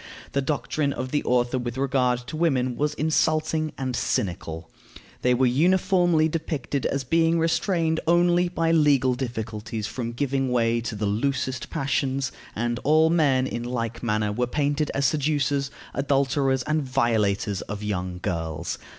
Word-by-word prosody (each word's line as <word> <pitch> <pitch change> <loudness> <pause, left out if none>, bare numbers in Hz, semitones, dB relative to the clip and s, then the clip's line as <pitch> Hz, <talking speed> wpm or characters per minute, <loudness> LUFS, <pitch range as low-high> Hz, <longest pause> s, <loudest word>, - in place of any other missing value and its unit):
The 140 - 0
doctrine 145 0 -1
of 130 0 -5
the 145 - 0
author 125 +1 +1
with 120 0 -4
regard 125 -2 +1
to 155 - -7
women 130 -7 +1
was 150 +3 -1
insulting 155 0 +1
and 130 -2 -2
cynical. 85 -9 -2 0.5
They 125 0 +3
were 130 +1 +3
uniformly 175 +3 +3
depicted 155 -3 -2
as 140 -1 -2
being 165 +4 +2
restrained 165 0 +1
only 175 +1 +3
by 165 -2 0
legal 145 -5 +4
difficulties 110 -3 -4
from 120 +1 -4
giving 135 0 -1
way 115 -1 +2
to 115 -1 -4
the 105 +1 -2
loosest 130 +3 -1
passions; 135 -1 -1 0.2
and 120 +2 -1
all 155 +2 +4
men, 140 -6 +3
in 120 - -3
like 115 -2 -3
manner, 105 -2 0
were 125 +4 -1
painted 145 +3 0
as 140 0 +1
seducers, 140 -1 +1 0.2
adulterers, 135 -1 +1
and 155 +3 0
violators 110 -7 0
of 105 0 -6
young 90 -3 -3
girls. 80 -3 -3
130 Hz, 150 wpm, -25 LUFS, 120-155 Hz, 0.5 s, legal